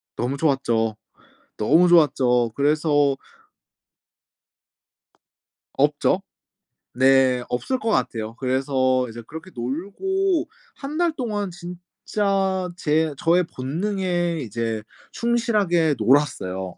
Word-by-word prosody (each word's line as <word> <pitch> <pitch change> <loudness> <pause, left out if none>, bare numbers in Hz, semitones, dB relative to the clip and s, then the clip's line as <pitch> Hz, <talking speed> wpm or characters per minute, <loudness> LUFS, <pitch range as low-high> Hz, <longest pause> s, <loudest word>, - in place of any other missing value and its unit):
너무 130 +4 -2
좋았죠. 120 -7 +1 0.6
너무 160 +11 +4
좋았죠. 130 -8 +3
그래서 145 -1 +2 2.6
없죠. - - +2 0.7
네. 130 -1 +4
없을 255 - -2
것 225 - -2
같아요. 115 - -1
그래서 130 -1 +1
이제 115 +1 -8
그렇게 160 +4 -9
놀고 315 - -1 0.3
1 290 +2 -6
달 345 -2 +2
동안 210 -7 -2
진짜 185 +2 -2
제 155 -1 +1
저의 175 +3 +2
본능에 175 +4 -1
이제 115 -2 -3 0.3
충실하게 210 - +1
놀았어요. 100 - +1
150 Hz, 190 characters per minute, -23 LUFS, 125-190 Hz, 2.6 s, 너무